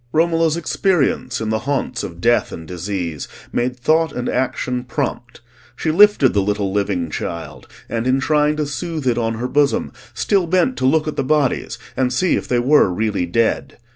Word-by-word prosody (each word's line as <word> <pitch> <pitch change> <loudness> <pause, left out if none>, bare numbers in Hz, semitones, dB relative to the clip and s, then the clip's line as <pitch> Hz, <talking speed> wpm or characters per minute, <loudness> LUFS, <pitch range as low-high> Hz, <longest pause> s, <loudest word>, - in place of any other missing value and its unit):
Romola's 165 0 +2
experience 160 -7 0
in 110 -1 -3
the 110 0 0
haunts 130 -3 -1
of 85 -1 -7
death 120 +5 +2
and 80 -1 -8
disease 90 -3 -4 0.3
made 125 +1 -1
thought 160 +4 +2
and 125 -3 -4
action 125 -1 -1
prompt: 125 - -4 0.3
she 160 - -1
lifted 200 -6 +5
the 100 - +2
little 100 -1 -1
living 100 -5 -1
child, 75 -6 -6 0.2
and 115 +1 -2
in 130 +1 +3
trying 150 +2 +2
to 150 -1 -1
soothe 155 +1 -4
it 120 -2 +1
on 115 -1 -1
her 120 +3 -3
bosom, 140 +2 +1 0.2
still 190 -5 +1
sent 220 +8 +2
to 130 - 0
look 155 +3 +2
at 155 - -4
the - - +1
bodies 145 -1 0 0.2
and 130 -1 +1
see 175 +8 +2
if - - -3
they 125 - +1
were 130 -2 +4
really 100 -2 -1
dead. 115 +6 0
125 Hz, 185 wpm, -19 LUFS, 105-155 Hz, 0.3 s, lifted